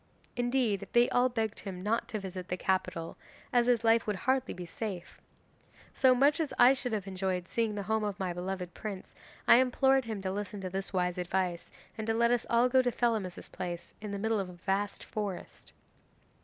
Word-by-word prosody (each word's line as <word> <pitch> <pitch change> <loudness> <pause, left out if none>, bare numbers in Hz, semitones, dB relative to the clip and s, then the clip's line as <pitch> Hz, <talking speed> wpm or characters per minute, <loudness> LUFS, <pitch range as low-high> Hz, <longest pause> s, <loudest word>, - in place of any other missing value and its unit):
Indeed, 245 -4 0
they 240 +1 +5
all 250 +1 +4
begged 225 -3 -2
him 185 -2 -7
not 225 +3 0
to 220 -3 -3
visit 185 -2 -6
the 180 - -2
capital, 180 -3 -1 0.4
as 240 -1 +4
his 240 -2 +3
life 225 0 +4
would 210 - 0
hardly 260 +6 0
be 180 - -6
safe. 185 0 -6 0.7
So, 260 -1 +5
much 285 +4 +4
as 315 -3 -1
I 250 +2 +8
should 255 -2 -3
have 210 -3 -2
enjoyed 185 -2 -2
seeing 225 -1 0
the 200 - -3
home 220 +2 0
of 205 -2 -3
my 185 -2 -1
beloved 180 0 -4
prince, 200 -3 -7 0.3
I - - +9
implored 265 +1 +3
him 220 -3 -4
to 190 -1 -2
listen 205 +1 -4
to 185 -1 -5
this 195 +1 -3
wise 180 -1 0
advice 180 -1 -2 0.3
and 220 - -3
to 225 - +1
let 235 +1 +3
us 245 -2 +1
all 235 +1 +4
go 260 +1 +4
to 250 -1 0
Thelamis's 220 -7 -1
palace 175 -2 -6
in 210 - -5
the 200 - -3
middle 220 +1 0
of 190 -2 -3
a - - -9
vast 195 +3 -2
forest. 205 -4 -6
210 Hz, 205 wpm, -31 LUFS, 185-240 Hz, 0.7 s, I